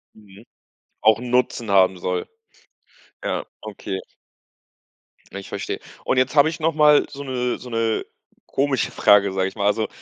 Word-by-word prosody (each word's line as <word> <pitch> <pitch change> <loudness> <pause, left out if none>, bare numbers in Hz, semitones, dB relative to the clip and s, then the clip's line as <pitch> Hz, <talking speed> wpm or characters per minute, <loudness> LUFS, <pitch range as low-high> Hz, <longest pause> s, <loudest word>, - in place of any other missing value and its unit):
Mhm. 100 -2 -17 0.6
Auch 110 0 +4
‘n 125 0 -6
Nutzen 125 -2 0
haben 95 -1 +4
soll. 90 +1 -3 1.0
Ja, - - -2 0.2
okay. 100 -2 -6 1.3
Ja, 100 - -6
ich 100 - -11
verstehe. - - -4 0.3
Und, - - +1
jetzt 130 +3 +1
habe 150 +1 +6
ich 165 - -7
nochmal 150 -2 +4
so 140 0 -8
‘ne 125 -2 -2
so 125 - -11
‘ne 115 -1 -1 0.4
komische 135 -2 0
Frage, 100 -2 +4
sage 95 0 0
ich 95 - -8
mal, 100 - -2
also 110 +2 +1
115 Hz, 155 wpm, -22 LUFS, 100-130 Hz, 1.3 s, habe